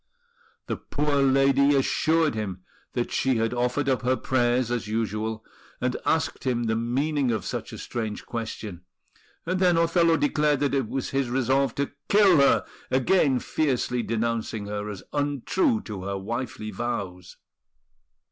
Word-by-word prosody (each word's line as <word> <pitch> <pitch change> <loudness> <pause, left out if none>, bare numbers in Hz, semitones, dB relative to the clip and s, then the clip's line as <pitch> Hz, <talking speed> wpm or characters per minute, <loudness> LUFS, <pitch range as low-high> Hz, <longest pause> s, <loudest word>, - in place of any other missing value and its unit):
The - - -3
poor 145 0 -1
lady 135 +1 +4
assured 155 +3 +2
him 95 -4 -4 0.3
that - - -2
she 130 -1 +1
had 115 +1 0
offered 125 +3 0
up 130 -2 +1
her 130 +1 +2
prayers 120 -1 +1
as 120 -3 -2
usual, 110 0 -2 0.3
and 125 0 -1
asked 160 -2 0
him 125 -2 0
the 110 -1 0
meaning 135 +4 0
of 110 -2 -1
such - - -4
a - - -7
strange 110 -3 -4
question; 110 -5 -5 0.6
and 185 +2 -1
then 180 -2 +4
Othello 165 0 +3
declared 150 - +2
that 145 -1 +1
it 135 -5 +1
was 135 - -3
his 135 -2 0
resolve 135 +2 +1
to 140 0 -2 0.2
kill 200 -4 +6
her, 140 -1 +4 0.2
again 135 +1 +3
fiercely 125 -2 0
denouncing 115 -2 -2
her 105 0 -4
as 100 -3 -7
untrue 145 - +1
to 105 -4 -7
her 100 0 -2
wifely 110 +1 -4
vows. 95 -5 -4
125 Hz, 150 wpm, -26 LUFS, 110-145 Hz, 0.6 s, kill